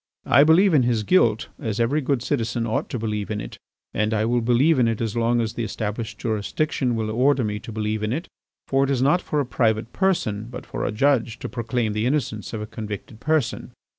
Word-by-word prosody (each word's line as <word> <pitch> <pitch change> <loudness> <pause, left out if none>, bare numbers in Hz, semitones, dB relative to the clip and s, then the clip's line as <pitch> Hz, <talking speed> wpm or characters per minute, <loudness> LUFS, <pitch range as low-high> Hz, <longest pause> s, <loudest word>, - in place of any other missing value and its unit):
I 140 - +6
believe 170 +5 +5
in 145 - +5
his 120 -3 +1
guilt 115 - +3
as 110 0 -3
every 130 +7 +2
good 135 -3 0
citizen 120 -3 -1
ought 110 - -1
to - - -3
believe 105 -2 -3
in 105 -1 -2
it; - - -8 0.3
and 105 +2 0
I 110 0 +1
will 120 +1 +1
believe 130 +6 +3
in 120 - +4
it 115 -2 -1
as 115 -2 -2
long 120 +1 +2
as 110 -1 -1
the 120 - -3
established 105 0 -4
jurisdiction 120 +3 -1
will 110 -1 -2
order 130 +3 +3
me 105 -1 -2
to 115 +2 -9
believe 110 0 -2
in 105 0 -1
it, 160 +8 -3 0.4
for 135 0 +2
it 135 - 0
is 130 -2 +1
not 170 +7 +3
for 150 - -1
a 140 - +1
private 115 -2 0
person 115 - 0
but 125 0 -8
for - - -4
a - - -1
judge 120 0 +1
to - - -6
proclaim 115 -2 -2
the 105 +3 0
innocence 125 -7 -2
of 110 -2 -4
a - - -4
convicted 105 0 -7
person. 155 -3 -1
115 Hz, 225 wpm, -23 LUFS, 110-135 Hz, 0.4 s, I